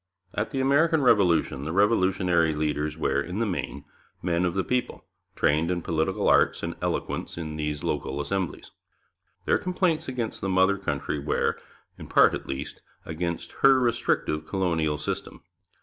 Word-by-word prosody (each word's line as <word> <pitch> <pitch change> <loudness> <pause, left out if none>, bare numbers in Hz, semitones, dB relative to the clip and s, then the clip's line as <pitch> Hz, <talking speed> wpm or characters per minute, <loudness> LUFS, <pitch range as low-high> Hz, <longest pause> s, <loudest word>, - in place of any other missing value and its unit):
At 105 - -2
the 135 -2 -2
American 150 +3 +3
Revolution 90 - +3
the 80 - -3
revolutionary 95 -4 +2
leaders 75 0 -1
were, 70 -3 +1
in 90 +6 -5
the 115 - +1
main, 80 -7 -4 0.4
men 85 +1 +1
of 85 0 -1
the 95 - +1
people, 125 -1 -2 0.3
trained 80 +3 +2
in 90 -2 -1
political 85 +5 0
arts - - +3
and - - -2
eloquence - - -3
in 80 -2 -5
these 75 -1 -3
local 70 +2 -2
assemblies; 90 +5 -3 0.7
their - - +2
complaints 180 -3 0
against 125 -4 -4
the 95 - -2
mother 95 +1 +3
country 70 -7 -2
were, - - 0 0.4
in - - -9
part - - +5
at - - -5
least, 65 0 -5 0.2
against 85 +1 -4
her 135 -1 +7
restrictive 80 -10 0
colonial 80 -6 0
system. - - -5
90 Hz, 155 wpm, -26 LUFS, 75-105 Hz, 0.7 s, her